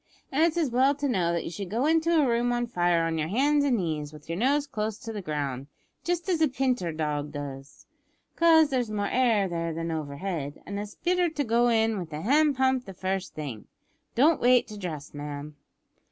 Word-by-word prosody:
An' 280 - +1
it's 335 0 +3
as 310 -7 +1
well 265 +4 +3
to 285 0 -2
know 180 -9 +1
that 170 -1 -1
you - - -5
should 190 +1 -6
go 235 +7 0
into 325 +1 +2
a 285 - +3
room 240 0 +1
on 240 0 0
fire 175 -6 +1
on 165 -1 -1
your 155 - -1
hands 285 - +2
and 265 -4 +2
knees, 155 -5 -3
with 150 -1 -14
your 165 - -3
nose 280 +4 +2
close 215 -5 -3
to 225 0 -7
the 210 - -4
ground 140 -5 -3 0.4
just 345 0 -1
as 350 -4 +1
a 315 - +5
pinter 255 - -1
dog 150 -2 -2
goes 140 -1 -8 0.5
'cause 320 -3 +5
there's 250 -4 0
more 205 -1 -1
air 230 -6 +2
there 170 -1 -2
than 165 0 -3
overhead; 150 0 -4
an' 200 0 -4
it's 205 0 -7
better 360 0 +1
to 300 -2 -2
go 235 0 +2
in 225 -2 +2
wi' 180 - -4
the 155 -1 -7
hand 290 - +3
pump 260 -1 +2
the 195 - -9
first 190 +1 -3
thing. 140 -8 -6 0.5
Don't 300 +6 +4
wait 245 0 +4
to 215 - -8
dress, 155 -6 -6
ma'am." 145 0 -6
210 Hz, 215 wpm, -27 LUFS, 160-265 Hz, 0.5 s, a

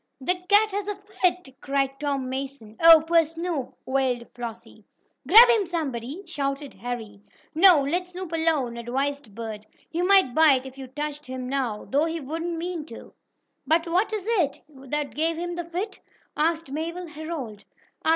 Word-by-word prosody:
"The 275 +7 +1 0.2
cat 420 +1 +5
has 405 0 -3
a 415 - -2
fit!" 365 -8 -2
cried 275 -1 -1
Tom 280 -3 -2
Mason. 260 -4 -6
"Oh, 330 -1 +9
poor 335 0 +4
Snoop!" 330 -3 -4
wailed 260 -3 0
Flossie. 230 -2 -8 0.4
"Grab 465 +3 +10
him, 450 -5 +3
somebody!" 295 - -4
shouted 280 -3 -3
Harry. 220 -1 -6 0.3
"No, 330 -3 +7
let 350 +6 -1
Snoop 360 -1 -7
alone!" 315 -8 +1
advised 265 -1 -3
Bert. 220 -2 -7 0.2
"He 335 - -1
might 380 -8 +4
bite, 280 -4 +5
if 265 0 -9
you 270 -1 -8
touched 295 +2 -5
him 255 -1 -5
now, 255 -5 -2
though 285 +4 +1
he 330 0 -3
wouldn't 330 +4 -4
mean 340 -1 -4
to." 230 - -11 0.5
"But 330 +2 +3
what 370 +6 +1
is 425 -3 -3
it? 355 -12 +1
What 285 0 -5
gave 325 +2 0
him 350 +1 -3
the 345 -1 -4
fit?" 370 +5 -5 0.4
asked 325 -1 0
Mabel 335 +4 -4
Herold. 300 -10 -7
300 Hz, 160 wpm, -25 LUFS, 265-345 Hz, 0.5 s, Grab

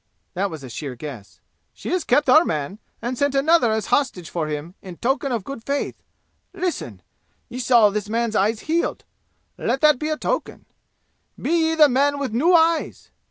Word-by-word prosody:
That 195 +2 -1
was 160 -5 -8
a 130 - -8
sheer 135 0 -6
guess. 120 -6 -9 0.3
"She - - -8
has 360 -2 0
kept 280 +4 +2
our 310 +6 +7
man 155 - -3 0.2
and 245 +2 -2
sent 285 -1 +1
another 275 -3 +4
as 220 -1 -1
hostage 215 - 0
for 165 -3 -2
him 150 +3 -5
in 180 -3 -10
token 270 +2 -1
of 230 -5 -2
good 255 0 -8
faith! 280 +3 -3 0.5
Listen! 365 -2 -4 0.5
Ye 250 - -6
saw 235 -4 +5
this 210 0 -3
man's 230 0 -1
eyes 215 +3 +1
healed. 330 +2 -1 0.5
Let 255 +3 -1
that 300 -4 +5
be 305 - -2
a 310 - -1
token! - - -3 0.7
Be - - -2
ye 325 -1 +2
the 305 -2 +7
men 285 +2 +2
with 275 -6 -3
new 300 +10 +3
eyes! 325 0 +1
245 Hz, 185 wpm, -22 LUFS, 195-295 Hz, 0.7 s, our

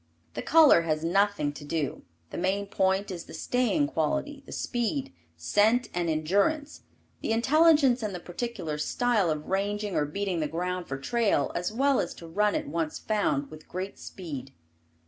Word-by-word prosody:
The - - -4
color 315 - +6
has 155 -1 -1
nothing 190 -4 +1
to 145 - -10
do, 145 -1 -2 0.3
the - - -5
main 195 +3 0
point 195 +1 0
is 175 -2 -6
the - - -10
staying 255 +4 +1
quality, 280 - -2
the - - -10
speed, 265 +3 -2 0.2
scent 210 - +2
and 175 -1 -1
endurance; 200 - 0 0.4
the - - -2
intelligence 275 +1 +4
and 210 -4 -3
the - - -4
particular 175 -4 -4
style 215 +3 +1
of 155 -1 -2
ranging 205 +1 -1
or 150 - +2
beating 185 +3 -2
the 155 - 0
ground 180 +3 -3
for 135 - -4
trail 220 - +1
as 175 +3 -2
well 270 +4 +2
as 175 - -2
to 170 - -11
run 210 +5 +1
it - - -2
once 160 0 -2
found, 150 -10 -1
with 155 0 -12
great 185 +2 -5
speed. 140 -8 -7
195 Hz, 170 wpm, -28 LUFS, 160-235 Hz, 0.4 s, color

